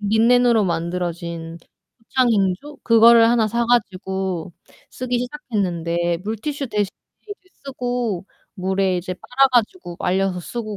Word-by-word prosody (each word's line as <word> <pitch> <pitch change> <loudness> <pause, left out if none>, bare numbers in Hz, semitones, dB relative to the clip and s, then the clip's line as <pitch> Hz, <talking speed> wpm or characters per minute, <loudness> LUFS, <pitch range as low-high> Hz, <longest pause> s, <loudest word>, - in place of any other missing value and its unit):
린넨으로 225 +1 +3
만들어진 170 -1 -3 0.5
소창행주? 235 +2 +1
그거를 230 0 +6
하나 225 -3 +2
사 235 +2 0
가지고 190 -6 -1 0.4
쓰기 250 -1 -2
시작했는데, 175 - -2
물티슈 275 +6 -3
대신에 210 -3 -1 0.3
이제 415 - -8 0.3
쓰고 245 -8 -3 0.3
물에 190 -1 0
이제 185 +1 -5
빨아 270 +8 +2
가지고 235 - 0
말려서 185 0 0
쓰고 215 +2 -6
210 Hz, 290 characters per minute, -21 LUFS, 180-245 Hz, 0.5 s, 그거를